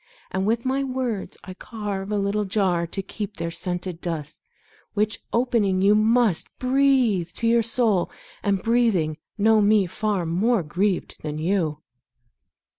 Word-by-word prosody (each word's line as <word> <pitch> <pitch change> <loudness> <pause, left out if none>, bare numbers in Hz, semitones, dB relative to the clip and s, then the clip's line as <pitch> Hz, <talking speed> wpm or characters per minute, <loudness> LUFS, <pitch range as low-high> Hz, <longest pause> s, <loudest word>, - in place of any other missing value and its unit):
And 190 +1 -1
with 230 +2 0
my 265 +1 +1
words 255 -6 -3
I 185 - -8
carve 200 -1 -5
a 210 - 0
little 200 +1 0
jar 185 -4 +1
To 195 +3 -4
keep 205 +1 -6
their 170 0 -3
scented 175 0 -4
dust, 160 -3 -5 0.5
Which, 215 +1 0
opening, 220 -6 +1
you 200 +1 +6
must 220 -3 +3
Breathe 255 -8 +2
to 230 - -3
your 230 0 +4
soul, 225 -5 +1 0.3
and, 200 -2 0
breathing, 220 -10 +2 0.2
know 220 +1 +4
me 205 -1 +4
far 195 0 -1
More 195 +5 +1
grieved 180 +5 -1
than 150 -1 -4
you. 160 -3 -1
205 Hz, 145 wpm, -24 LUFS, 180-230 Hz, 0.5 s, you